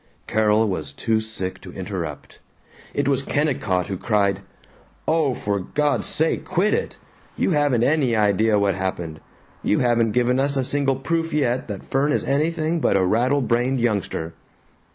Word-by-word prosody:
Carol 110 0 +2
was 80 -8 -3
too 110 +8 0
sick 110 -4 -5
to - - -10
interrupt. - - -6 0.5
It 145 -1 -1
was 135 -1 +2
Kennicott 130 - 0
who 95 - -4
cried, 100 -3 +1 0.7
"Oh, 155 -5 +2
for 100 -1 -1
God's 145 +10 0
sake 160 +1 0
quit 185 +3 +1
it! - - -2 0.4
You - - +1
haven't 145 -7 +2
any 135 -4 +2
idea 105 +1 +3
what 100 -1 +2
happened. 90 -4 -4 0.4
You - - +1
haven't 120 -3 +2
given 125 +1 +2
us 140 +1 +1
a 135 - +1
single 135 0 +1
proof 165 +4 -2
yet 130 -4 0
that 100 -3 -6
Fern 140 +2 +2
is - - 0
anything 160 +3 0
but 120 - +2
a 95 - +2
rattle 125 +9 +2
brained 125 +2 +1
youngster." 100 -8 -1
120 Hz, 160 wpm, -22 LUFS, 105-145 Hz, 0.7 s, idea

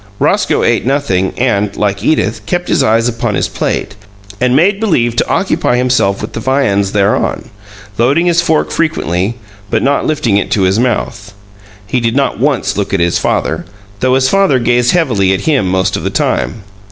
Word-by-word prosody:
Roscoe - - +1
ate - - +1
nothing, 120 -9 0
and, 105 -5 0
like 100 -1 -1
Edith, 110 -6 0
kept 175 0 -2
his - - +2
eyes 115 -2 +2
upon 115 -1 -2
his - - 0
plate - - -3 0.5
and 125 0 +2
made 195 +7 +3
believe 120 - +1
to - - 0
occupy 180 -9 0
himself 125 -6 +1
with - - -6
the - - -4
viands 105 -6 0
thereon, 100 0 0 0.5
loading 140 +9 +2
his 175 -1 +3
fork 160 -2 0
frequently, 110 - -1 0.3
but - - 0
not 140 +1 +1
lifting 145 -10 +1
it 105 - -1
to 100 - +1
his 95 +3 +2
mouth. 110 -4 -2 0.5
He 125 - -1
did 115 0 -1
not 140 -4 0
once 130 -7 0
look 100 -1 -1
at - - 0
his 85 0 +1
father, - - -1 0.4
though 130 +2 +2
his 130 0 +2
father 195 -3 +3
gazed 120 0 +1
heavily 115 - +2
at 95 - -4
him 135 -12 +1
most 95 0 0
of - - -3
the - - -1
time. 105 -2 -2
120 Hz, 185 wpm, -13 LUFS, 100-140 Hz, 0.5 s, made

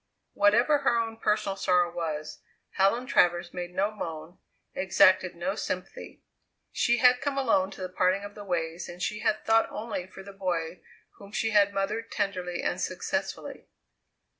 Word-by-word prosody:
Whatever 235 +9 +4
her 270 -4 +2
own 225 -1 -2
personal 210 -2 0
sorrow 180 -2 +2
was, 155 -3 -4 0.3
Helen 200 +6 +2
Travers 175 -6 +2
made 180 0 -6
no 200 +2 +1
moan, 165 -4 -7 0.3
exacted 185 -1 +3
no 175 +3 -2
sympathy. 200 - -6 0.5
She 240 0 +2
had 250 +1 +5
come 280 0 -2
alone 225 -8 +2
to 195 - -11
the 185 - -2
parting 185 +2 +1
of 205 0 -8
the 205 - -9
ways, 170 -2 -3
and 175 0 -9
she 210 +3 -2
had 215 0 0
thought 225 0 +3
only 215 -5 -5
for 195 - -12
the 200 0 -11
boy 175 -3 -3 0.4
whom 200 0 -12
she 225 +1 -1
had 205 -1 +4
mothered 200 +3 -2
tenderly 180 -4 -2
and - - -1
successfully. - - -4
195 Hz, 165 wpm, -28 LUFS, 180-215 Hz, 0.5 s, had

